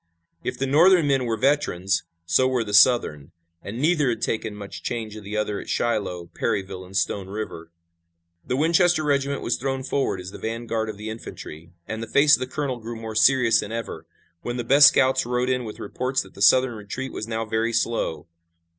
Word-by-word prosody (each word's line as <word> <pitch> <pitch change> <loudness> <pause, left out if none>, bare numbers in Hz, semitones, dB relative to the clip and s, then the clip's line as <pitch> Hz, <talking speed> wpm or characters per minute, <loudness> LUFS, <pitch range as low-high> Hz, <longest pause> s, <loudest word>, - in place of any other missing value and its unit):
If - - -3
the 135 - -1
Northern 165 +5 +5
men 135 -3 +1
were 115 -1 -1
veterans, 95 -10 +1 0.2
so 85 +10 +3
were 130 -2 0
the 105 -2 -7
Southern, 95 - +4 0.3
and 110 +4 -7
neither 150 -2 +2
had 115 -2 -3
taken 110 -1 -2
much 100 -1 -9
change 110 -3 -4
of 110 - -9
the 105 +2 -5
other 105 -1 -1
at - - -10
Shiloh, 95 -7 -2
Perryville 95 -2 -3
and 95 +1 -6
Stone 95 +2 -1
River. 95 -5 -6 0.7
The 125 - -2
Winchester 170 +2 +3
regiment 140 -1 0
was 120 - 0
thrown 135 0 -3
forward 135 -7 -1
as 90 +1 -8
the - - -10
vanguard 115 -1 -3
of 105 - -7
the 105 +1 -6
infantry, 85 -7 -9 0.2
and 110 0 -5
the 115 - -5
face 145 +5 +5
of - - -8
the 130 - -3
colonel 135 -2 -3
grew 115 +1 -7
more 115 -1 -7
serious 115 +1 +4
than 105 - -4
ever, 115 0 -6 0.3
when 120 +1 -4
the 120 - -2
best 140 +4 +7
scouts 130 -2 +3
rode 125 +1 -1
in 125 -1 -1
with 105 - -8
reports 130 +5 -2
that 95 - -17
the - - -12
Southern 130 +4 +5
retreat 115 +5 -6
was 110 - -5
now 115 0 -3
very 110 +1 -1
slow. 110 -10 -1
115 Hz, 205 wpm, -24 LUFS, 105-130 Hz, 0.7 s, best